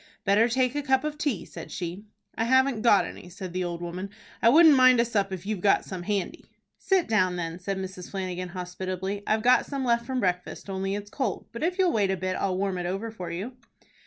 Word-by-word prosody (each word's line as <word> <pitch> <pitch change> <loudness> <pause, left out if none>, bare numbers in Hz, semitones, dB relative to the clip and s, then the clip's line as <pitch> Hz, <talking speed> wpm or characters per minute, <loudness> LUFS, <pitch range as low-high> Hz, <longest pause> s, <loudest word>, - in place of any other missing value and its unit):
"Better 210 +4 +4
take 255 +1 +1
a 290 - -1
cup 265 -1 +2
of 305 0 -3
tea," 290 - -2
said - - -9
she. 180 +3 -5 0.3
"I 225 - -1
haven't 260 -1 +3
got 215 -4 +5
any," 175 - -9
said 185 -1 -8
the 185 0 -1
old 175 -1 -4
woman. 180 +3 -5 0.3
"I 230 - +6
wouldn't 315 +2 +8
mind 255 -2 +6
a 235 - +4
sup 200 -4 0
if 190 -1 -6
you've 210 -3 -3
got 200 - +3
some 185 -2 -6
handy." 200 +1 -3 0.3
"Sit 380 -3 +2
down 185 -5 +2
then," 170 0 -4
said 195 +1 -3
Mrs. 185 -1 -6
Flanagan, 185 -2 -4
hospitably. 185 +2 -4
"I've 220 0 +1
got 250 +1 +4
some 275 -2 -3
left 235 -1 +1
from 260 -1 -1
breakfast, 180 0 -2
only 195 +1 -2
it's 205 0 -7
cold, 255 -10 -2
but 235 - -7
if 355 +3 0
you'll 370 -2 +3
wait 205 -3 +2
a 190 - 0
bit, 185 0 -2
I'll 185 -1 -1
warm 190 -1 -1
it 175 - -2
over 195 +5 -3
for 185 -6 -7
you." 200 +10 -5
200 Hz, 230 wpm, -27 LUFS, 185-240 Hz, 0.3 s, wouldn't